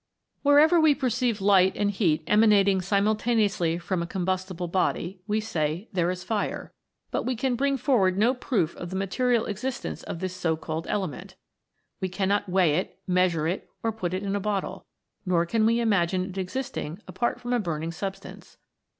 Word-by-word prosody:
Wherever 305 Hz, +4 st, +5 dB
we 310 Hz, -2 st, +5 dB
perceive 245 Hz, -4 st, 0 dB
light 190 Hz, -1 st, +4 dB
and 205 Hz, -1 st, +1 dB
heat 175 Hz, -7 st, +1 dB
emanating 205 Hz, -3 st, +4 dB
simultaneously 205 Hz, -2 st, +1 dB
from 175 Hz, +1 st, -2 dB
a 170 Hz, -, -3 dB
combustible 185 Hz, -1 st, -2 dB
body, 180 Hz, +1 st, -1 dB
we 210 Hz, +1 st, +1 dB
say 170 Hz, -2 st, -2 dB
there 175 Hz, -2 st, +1 dB
is 180 Hz, 0 st, -4 dB
fire 210 Hz, -1 st, -3 dB, 0.4 s
but -, -, 0 dB
we 255 Hz, -, -2 dB
can 255 Hz, +2 st, 0 dB
bring 275 Hz, +2 st, +1 dB
forward 225 Hz, -8 st, +2 dB
no 230 Hz, +5 st, +4 dB
proof 210 Hz, -, -1 dB
of 175 Hz, -, -6 dB
the 185 Hz, -, -5 dB
material 230 Hz, +5 st, +1 dB
existence 240 Hz, +5 st, -4 dB
of -, -, -6 dB
this 185 Hz, +1 st, -4 dB
so 165 Hz, -3 st, 0 dB
called 160 Hz, 0 st, -5 dB
element. 190 Hz, -1 st, -4 dB, 0.6 s
We 190 Hz, -2 st, -2 dB
cannot 200 Hz, +2 st, 0 dB
weigh 180 Hz, -3 st, +3 dB
it, 185 Hz, -, -3 dB
measure 180 Hz, -4 st, +2 dB
it, 180 Hz, +4 st, -3 dB
or 225 Hz, -, +1 dB
put 185 Hz, -5 st, -3 dB
it 190 Hz, -, -3 dB
in 200 Hz, 0 st, -1 dB
a -, -, 0 dB
bottle; 200 Hz, -1 st, -3 dB, 0.4 s
nor 175 Hz, -3 st, +2 dB
can 220 Hz, +4 st, +2 dB
we 230 Hz, +1 st, +2 dB
imagine 185 Hz, -5 st, +1 dB
it 190 Hz, -, -10 dB
existing 190 Hz, -, -4 dB
apart 240 Hz, -, -1 dB
from 245 Hz, 0 st, -3 dB
a 245 Hz, -, +2 dB
burning 165 Hz, -4 st, -3 dB
substance. 195 Hz, +3 st, -7 dB
195 Hz, 175 wpm, -26 LUFS, 180-225 Hz, 0.6 s, Wherever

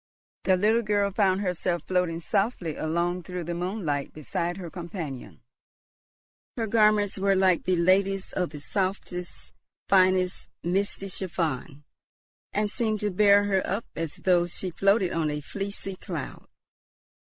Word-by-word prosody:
The 185 Hz, -1 st, +4 dB
little 220 Hz, +5 st, +3 dB
girl 205 Hz, -2 st, +1 dB
found 195 Hz, -1 st, +2 dB
herself 180 Hz, -2 st, -1 dB
floating 180 Hz, -3 st, 0 dB
softly 175 Hz, -, -1 dB
along 170 Hz, +3 st, -1 dB
through 180 Hz, 0 st, -5 dB
the 170 Hz, +1 st, -3 dB
moonlight 170 Hz, -5 st, -2 dB
beside 170 Hz, +4 st, -3 dB
her 175 Hz, -4 st, -7 dB
companion. 170 Hz, -7 st, -7 dB, 1.2 s
Her 230 Hz, -, 0 dB
garments 210 Hz, -2 st, +3 dB
were 195 Hz, 0 st, +3 dB
like 190 Hz, -2 st, +3 dB
the 185 Hz, -, +2 dB
lady's, 190 Hz, +2 st, +2 dB
of 180 Hz, -3 st, 0 dB
the 150 Hz, 0 st, -8 dB
softest, 185 Hz, -1 st, -3 dB, 0.3 s
finest, 185 Hz, -1 st, +3 dB, 0.2 s
misty 195 Hz, +2 st, 0 dB
chiffon, 165 Hz, -6 st, -3 dB, 0.7 s
and 210 Hz, +1 st, +1 dB
seemed 220 Hz, -3 st, 0 dB
to 210 Hz, -1 st, 0 dB
bear 200 Hz, +1 st, +5 dB
her 195 Hz, -2 st, +2 dB
up 205 Hz, +4 st, -2 dB
as 165 Hz, -2 st, -3 dB
though 175 Hz, -2 st, +2 dB
she 180 Hz, +1 st, -4 dB
floated 195 Hz, +1 st, +2 dB
on 160 Hz, -2 st, 0 dB
a 150 Hz, 0 st, -2 dB
fleecy 195 Hz, +4 st, -5 dB
cloud. -, -, -6 dB
185 Hz, 140 wpm, -27 LUFS, 170-200 Hz, 1.2 s, bear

